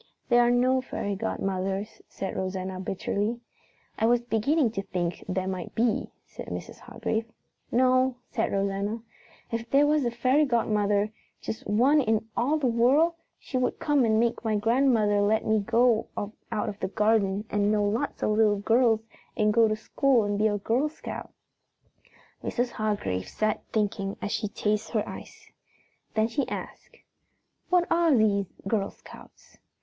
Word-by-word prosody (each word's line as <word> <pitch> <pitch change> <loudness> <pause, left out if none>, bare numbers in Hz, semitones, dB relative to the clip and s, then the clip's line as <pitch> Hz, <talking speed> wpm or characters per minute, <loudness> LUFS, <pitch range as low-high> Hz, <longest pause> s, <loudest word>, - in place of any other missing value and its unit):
"There 240 -1 +6
are 240 - +4
no 255 +2 +3
fairy 205 -5 -3
godmothers," 195 +1 -3
said 195 - -5
Rosanna 185 0 -3
bitterly. 200 +4 -2 0.6
"I 220 - +3
was 240 +1 +4
beginning 240 +3 +1
to 195 - -3
think 175 -3 -3
there 185 0 -1
might 185 -2 -5
be," 230 -1 +1 0.2
said - - -10
Mrs. - - -7
Hargrave. 220 0 -3 0.5
"No," 255 +1 +3 0.2
said - - -1
Rosanna. 200 +3 -1 0.5
"If 230 0 -3
there 280 +1 +5
was 300 -1 +2
a 240 - +1
fairy 255 +5 +2
godmother, 210 -5 +1 0.3
just 220 - -6
one 260 +8 +4
in 220 -3 0
all 280 +6 +1
the 295 - -2
world, 255 +8 +4 0.2
she 260 - -3
would 250 - 0
come 290 -3 +2
and 220 -1 +3
make 235 +1 0
my 220 -2 0
grandmother 225 -2 +3
let 215 +2 +2
me 220 0 +3
go 230 +2 +2
out 210 0 -4
of 205 - -5
the 190 - -1
garden 210 -1 +1
and 205 0 +2
know 210 -1 +2
lots 205 +3 -1
of - - +2
little 210 -1 +3
girls 225 +2 +3 0.4
and 210 -1 +3
go 230 0 +5
to 215 - 0
school 245 +2 +2
and 205 0 -1
be 215 - +4
a 205 -1 0
Girl 240 +9 0
Scout." 310 - -8 1.1
Mrs. 245 0 -1
Hargrave 200 - -2
sat 215 0 -1
thinking 205 -2 -1
as 205 - -4
she 215 - -1
tasted 210 +2 -2
her 215 -2 0
ice. - - -10 0.6
Then 220 0 +3
she 270 +4 -2
asked, - - -8 0.7
"What 360 -1 +4
are 330 -3 +4
these 205 -4 +2 0.2
Girl 200 -1 0
Scouts?" - - -16
220 Hz, 160 wpm, -27 LUFS, 205-245 Hz, 1.1 s, There